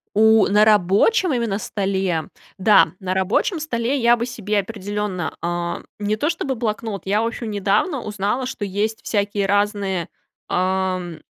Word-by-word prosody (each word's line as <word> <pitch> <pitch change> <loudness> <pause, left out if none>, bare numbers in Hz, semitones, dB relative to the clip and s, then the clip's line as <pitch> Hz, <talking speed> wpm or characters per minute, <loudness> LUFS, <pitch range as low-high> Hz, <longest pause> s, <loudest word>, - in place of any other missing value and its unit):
У, 220 0 +5
на 210 +1 +5
рабочем 215 - +3
именно 230 -5 -1
столе. 190 -6 -1 0.3
Да, 205 +2 +5
на 185 -1 -2
рабочем 190 - 0
столе 250 -2 -1
я 240 -1 +4
бы 235 - -2
себе 215 -4 -2
определенно, 205 -3 -4
а, 175 0 -3 0.2
не 210 +1 -1
то 300 - 0
что 335 - -2
бы 265 -2 -1
блокнот, 215 -3 -3
я, 205 +3 +1
в 230 - 0
общем, 230 -1 -5
недавно 210 - 0
узнала, 210 +5 -2
что 250 -5 -4
есть 205 +3 -2
всякие 205 -1 0
разные, 200 -3 0 0.4
ам 185 -2 -1
205 Hz, 155 wpm, -21 LUFS, 190-225 Hz, 0.4 s, У